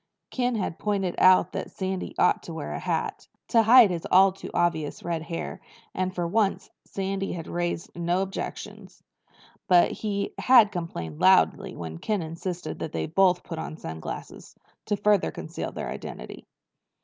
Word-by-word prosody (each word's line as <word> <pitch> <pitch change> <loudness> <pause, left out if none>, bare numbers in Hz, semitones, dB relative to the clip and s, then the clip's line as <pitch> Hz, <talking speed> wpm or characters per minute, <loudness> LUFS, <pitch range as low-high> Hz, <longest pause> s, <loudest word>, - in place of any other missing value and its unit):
Ken 250 -1 0
had 190 -6 -3
pointed 195 -4 -1
out 185 0 +6
that - - -4
Sandy 190 -1 -4
ought - - +3
to - - -8
wear - - -5
a - - -4
hat, - - -3 0.2
to 230 - +5
hide 225 -2 +7
his 170 -2 -4
all 190 +1 +6
too 190 - -9
obvious 160 -4 -1
red 170 -2 -2
hair, 165 +1 -5 0.3
and 185 0 -1
for 175 - -1
once 200 +2 0
Sandy 195 0 -3
had 165 -2 -6
raised 175 -1 -3
no 175 +2 0
objections. 195 0 -7 0.6
But 180 -1 +5
he 200 -2 -3
had 240 -5 +6
complained 85 - -5
loudly - - +4
when 80 -1 -7
Ken 210 -5 -1
insisted 165 +1 -5
that 160 - -5
they - - -1
both 180 +2 +3
put 165 -3 -6
on 155 - -6
sunglasses, 80 - -8 0.3
to 205 - 0
further 205 -1 +3
conceal - - -6
their - - -5
identity. - - -8
185 Hz, 160 wpm, -26 LUFS, 170-200 Hz, 0.6 s, hide